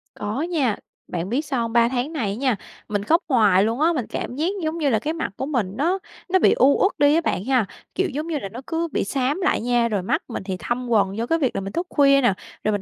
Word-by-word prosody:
Có 215 +7 -3
nha. 310 - 0 0.3
Bạn 175 +1 -3
biết 275 +7 -1
sao 270 -4 -1
hông? 230 -1 -3
3 235 0 +4
tháng 260 +5 -2
này 240 -10 -1
á 200 - -3
nha, 255 0 +1 0.3
mình 205 -1 -1
khóc 330 - +3
hoài 210 -8 +4
luôn 225 +6 -1
á, 335 +2 +4
mình 260 -8 -2
cảm 245 - -4
giác, 310 +5 0 0.2
giống 315 +1 -1
như 300 -4 +1
là, 220 -4 +2
cái 300 +9 -2
mặt 325 -9 -3
của - - -2
mình 245 -10 -1
nó 350 +7 +1 0.3
nó 375 +1 +4
bị - - +5
u 275 +2 +4
uất 390 - +4
đi 290 +1 +5
á 330 - +3
bạn 200 - -2
ha. 255 -4 +2 0.3
Kiểu, 380 0 +1
giống 300 +3 -4
như 325 -3 -1
là, 195 - -6
nó 230 +5 -8
cứ 330 0 -1
bị - - 0
xám 270 - -1
lại 365 - +1
nha, 240 0 +2
rồi 210 -4 -1
mắt 270 - -1
mình 230 - -5
thì 190 -1 -4
thâm 240 +9 -3
quầng 200 -3 +2
do 230 - -1
cái 330 +6 +1
việc 265 -5 0
là - - -1
mình 195 +1 -6
thức 350 +1 -2
khuya 275 -1 +4
nè, 245 -6 +3 0.3
rồi 215 - +1
mình 205 -1 -1
255 Hz, 285 wpm, -23 LUFS, 215-310 Hz, 0.3 s, bị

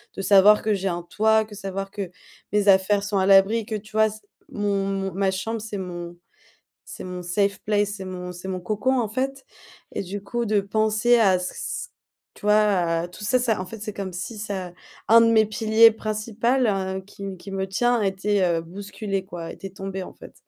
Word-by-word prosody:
de - - -4
savoir 200 +2 +6
que 215 -1 +1
j'ai 195 0 -2
un 175 -1 -2
toit, 220 +4 +2
que 210 -1 -12
savoir 195 0 -5
que 195 -4 -5 0.4
mes 210 -1 +2
affaires 200 +1 +4
sont 205 -1 -1
à 190 - +2
l'abri, 195 +3 +5
que, 220 - -6
tu 215 +1 -9
vois 220 0 +4
c 215 +1 -10 0.3
mon 200 -1 -1
mon 195 -1 -2
ma 195 +1 +1
chambre, 225 +4 -3
c'est 215 -2 -5
mon 175 -2 -6 0.7
c'est - - -9
mon 180 -1 -6
safe 200 +3 0
place, 205 -1 +1
c'est 190 - -7
mon 180 -1 -6
c'est 180 +2 -9
mon 185 -1 -3
cocon, 220 +7 0
en 220 - -1
fait 265 +4 -3 0.5
et - - -2
du 195 +2 -6
coup 240 +3 -2
de 210 -1 +2
penser 220 +4 +2
à 190 -5 +4
ç 180 - -5
ç 485 - -5 0.5
tu - - -17
vois, 210 - +6 0.5
à 170 - -4
tout 195 +4 -11
ça 255 +5 +2
ça 230 -5 0
en - - -5
fait 225 +2 -9
c'est 210 -2 -5
comme 195 -2 -5
si 205 +5 -6
ça 190 -4 -5 0.3
un 230 +1 +8
de 230 0 +4
mes 220 -1 +5
piliers 220 +1 +5
principal, 225 +4 -1
heu, 190 -1 -1
qui 200 +1 -12
m 195 -2 -6
qui 195 - -10
me 195 0 -2
tient 240 +5 +2
a 205 - +1
été, 195 +1 0
heu, 170 -2 +1
bousculé, 195 +2 -5
quoi, 170 -2 -7
était 195 - -8
tombé, 195 0 -5
en - - -10
fait. - - -13
200 Hz, 220 wpm, -24 LUFS, 190-220 Hz, 0.7 s, un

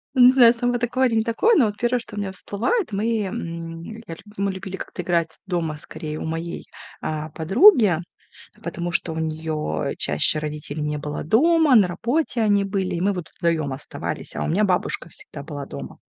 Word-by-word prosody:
Не 250 0 +8
знаю, 245 -3 +7
сама 245 +1 0
такое 245 +2 +1
или 230 - -1
не 220 - +3
такое, 415 - +3
но 260 - +5
вот 205 -1 -3
1, 240 +2 +1
что 220 -2 -11
у - - -3
меня 200 -2 -3
всплывает, 225 - -1
мы, 220 +3 0
м, 165 -3 -5
я 220 -2 -8
лю - - -16 0.2
мы 200 0 0
любили 190 0 -6
как-то - - -6
играть 170 -2 0
дома, 170 -5 -2
скорее, 155 0 -7
у - - -5
моей, 165 +2 -4 0.4
э, 155 0 -3
подруги, 205 - +5 0.7
потому 175 0 -3
что 165 0 0
у 160 - -4
неё 155 - -2
чаще 75 - +3
родителей 150 0 -4
не 150 0 -1
было 150 0 -5
дома, 310 - +4
на 200 -4 +5
работе 240 - -1
они 205 -2 +3
были, 195 -2 -2
и - - -3
мы 200 +3 +2
вот 180 -4 -5
вдвоём 165 -5 -1
оставались, 130 - -6
а - - -1
у - - -2
меня 195 +7 +2
бабушка 180 -2 0
всегда 140 - -9
была 145 -3 -6
дома. 70 - -8
185 Hz, 195 wpm, -23 LUFS, 160-230 Hz, 0.7 s, Не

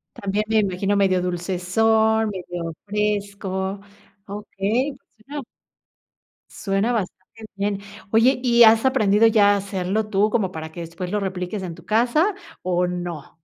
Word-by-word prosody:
También, 200 +2 -1
me 220 - +3
imagino, 200 0 0
medio 185 -2 +2
dulcezón, 210 +5 +1
medio 175 -3 -5
fresco. 200 -2 -2 0.5
Okey, 210 +6 -2
pues 220 -4 -30
suena 290 0 -5 1.1
suena 200 +4 -1
bastante 220 +1 -5
bien. 200 0 -1 0.3
Oye, 245 +4 +4
¿y 240 -1 +5
has 225 +2 +6
aprendido 220 -4 +4
ya 205 -2 +5
a - - +2
hacerlo 195 +2 -2
tú, 210 +1 +2
como 205 -5 0
para 160 -2 -7
que 170 - -8
después 170 +2 -6
lo 210 - 0
repliques 190 +1 -4
en 170 -3 -5
tu 170 - -15
casa, 245 - +2 0.3
o 180 0 +1
no? 175 -4 -6
200 Hz, 145 wpm, -22 LUFS, 185-220 Hz, 1.1 s, has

